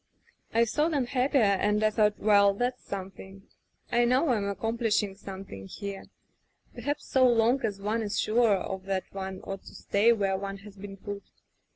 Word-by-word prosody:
"I 230 +1 +4
saw 300 +8 +1
them 285 -6 0
happier, 260 +1 +2
and 210 +1 +2
I 215 - +4
thought, 210 -1 +2
well, 200 -1 +4
that's 250 +3 -2
something. 195 0 -8 0.5
I 240 - +4
know 255 +6 +3
Fm 210 -5 +1
accomplishing 220 0 0
something 190 - -9
here. 200 - -7 0.7
Perhaps 290 +1 -3
so 260 -1 +4
long 240 +3 +3
as 205 -3 -2
one 215 +3 -1
is 205 -2 -2
sure 225 -1 +3
of 190 0 -5
that 195 -1 -1
one 190 -1 -5
ought 195 0 -6
to - - -12
stay 210 +4 +3
where 195 -4 +1
one 195 0 -5
has 205 -2 -12
been 195 0 -9
put. 200 +1 -6
205 Hz, 175 wpm, -28 LUFS, 195-235 Hz, 0.7 s, I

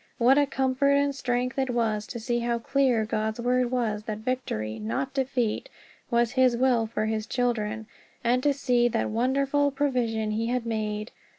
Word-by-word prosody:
What 255 +4 +5
a 285 - +3
comfort 270 +1 +1
and 280 0 +2
strength 250 0 -1
it 265 -1 0
was 220 -3 0
to 235 - -6
see 240 +1 -1
how 235 0 0
clear 245 -2 +1
God's 215 +1 -2
Word 250 +1 +1
was 230 -4 -1
that 215 -1 -3
victory, 210 - -3
not 115 - -3
defeat, 265 - -1 0.4
was 235 -1 +2
his 255 -2 +3
will 245 -3 +2
for 215 -1 -2
his 220 0 -2
children, 220 -3 -1 0.4
and 245 +2 +2
to 290 - +3
see 245 -3 +2
what - - -1
wonderful 275 +5 +1
provision 245 -6 -1
he 225 +2 -1
had 245 0 -1
made! 215 -1 -3
240 Hz, 175 wpm, -26 LUFS, 220-260 Hz, 0.4 s, What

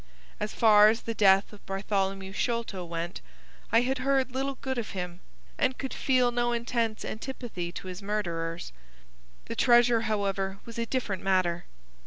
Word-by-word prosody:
As 210 0 -2
far 210 -2 +7
as 225 +1 0
the 230 - -3
death 195 -1 +4
of 205 - -14
Bartholomew 195 -1 -2
Sholto 230 -4 -2
went, 170 0 -5 0.5
I 230 +2 +5
had 260 +1 -1
heard 265 -1 +1
little 270 +2 -2
good 260 -1 -3
of 225 - -4
him, 180 -1 -4 0.4
and 260 -1 +1
could 265 - -4
feel 255 -2 +2
no 240 0 +1
intense 235 -2 -1
antipathy 220 -7 -5
to 185 - -7
his 185 +2 -6
murderers. 170 - -3 0.7
The - - -5
treasure, 240 -1 +5
however, 200 -3 -1
was 230 0 -7
a 230 - -1
different 225 -8 -2
matter. 185 -3 +1
215 Hz, 160 wpm, -28 LUFS, 190-240 Hz, 0.7 s, far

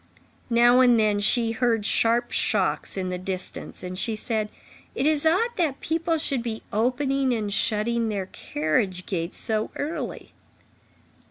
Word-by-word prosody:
Now 240 +1 +5
and 245 -3 +5
then, 210 -1 +2
she 225 +3 +2
heard 230 -2 0
sharp 235 +2 +2
shocks - - 0
in 185 -1 -2
the 180 0 -3
distance, 185 0 -5
and 185 0 -5
she 225 +1 -1
said: 215 -1 -1 0.5
"It 265 - 0
is 310 0 +3
odd 380 +9 +3
that 305 -6 0
people 330 +1 0
should 280 -5 0
be 225 -2 -5
opening 260 +4 +1
and 210 -3 -2
shutting 230 +1 +1
their 200 -3 -2
carriage 180 +3 -2
gates 170 -2 -3
so 220 -2 -1
early." 300 +3 -5
230 Hz, 150 wpm, -25 LUFS, 205-260 Hz, 0.5 s, Now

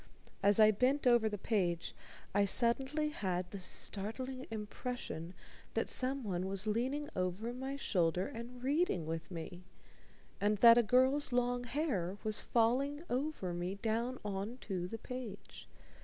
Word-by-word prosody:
As 200 +2 +4
I 215 0 +8
bent 255 +7 +1
over 240 -3 +5
the 210 - -3
page, 185 -5 0 0.4
I 205 - +4
suddenly 265 +8 +2
had 185 -9 -2
the 200 - -6
startling 240 +8 -5
impression 210 -5 -5 0.4
that - - +1
someone 235 -9 +1
was 195 +1 -1
leaning 255 +7 -1
over 185 +6 -2
my 265 +2 -4
shoulder 180 -8 +1
and 245 +2 -8
reading 275 - +1
with 165 +1 -4
me, 175 +1 -7 0.8
and 210 +1 +2
that 230 +2 +9
a - - +7
girl's 260 +5 +3
long 245 0 +1
hair 230 - -1
was 215 -1 +1
falling 270 +6 +1
over 255 - -1
me 175 +2 -3
down 230 +5 -1
on 205 +4 -3
to 180 -4 -3
the 225 - -5
page. 240 -4 -8
225 Hz, 140 wpm, -35 LUFS, 190-255 Hz, 0.8 s, that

